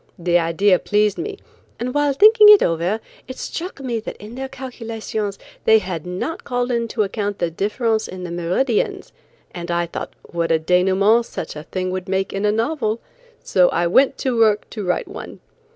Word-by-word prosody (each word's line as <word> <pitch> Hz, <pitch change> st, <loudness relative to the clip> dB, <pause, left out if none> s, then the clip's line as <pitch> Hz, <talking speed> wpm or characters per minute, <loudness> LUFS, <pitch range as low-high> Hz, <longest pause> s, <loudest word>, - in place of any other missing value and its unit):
The 175 Hz, 0 st, +2 dB
idea 175 Hz, +3 st, +3 dB
pleased 210 Hz, -1 st, +1 dB
me, 400 Hz, +3 st, -4 dB, 0.4 s
and 250 Hz, +1 st, -3 dB
while 290 Hz, -1 st, +2 dB
thinking 425 Hz, -, +7 dB
it 420 Hz, -1 st, +9 dB
over 170 Hz, +6 st, 0 dB, 0.3 s
it 255 Hz, -, -8 dB
struck 355 Hz, -1 st, -6 dB
me 240 Hz, -4 st, -2 dB
that 220 Hz, -, -7 dB
in 210 Hz, +2 st, -10 dB
their 265 Hz, +1 st, -5 dB
calculations 230 Hz, -5 st, -5 dB, 0.3 s
they 220 Hz, -, +7 dB
had 180 Hz, -5 st, -4 dB
not 185 Hz, -, -4 dB
called 245 Hz, 0 st, -1 dB
into 230 Hz, -2 st, 0 dB
account 205 Hz, 0 st, -3 dB
the 175 Hz, -1 st, -1 dB
difference 220 Hz, +5 st, -1 dB
in 185 Hz, 0 st, -8 dB
the 175 Hz, -, -5 dB
meridians 180 Hz, +8 st, -1 dB, 0.4 s
and 175 Hz, -1 st, -7 dB
I 170 Hz, 0 st, +1 dB
thought 170 Hz, -, -6 dB
what 170 Hz, -1 st, -2 dB
a 165 Hz, -, +5 dB
denouement 190 Hz, +7 st, +3 dB
such -, -, -6 dB
a 150 Hz, -, -6 dB
thing 185 Hz, +3 st, -4 dB
would 185 Hz, 0 st, -4 dB
make 190 Hz, 0 st, -1 dB
in 195 Hz, +1 st, -1 dB
a 210 Hz, -, +3 dB
novel, 225 Hz, -1 st, -1 dB, 0.4 s
so 180 Hz, -2 st, +4 dB
I 175 Hz, -, 0 dB
went 260 Hz, +11 st, +3 dB
to 260 Hz, -2 st, 0 dB
work 220 Hz, -2 st, +3 dB
to 215 Hz, -, -5 dB
write 180 Hz, -1 st, -1 dB
one. -, -, -9 dB
210 Hz, 185 wpm, -21 LUFS, 180-245 Hz, 0.4 s, it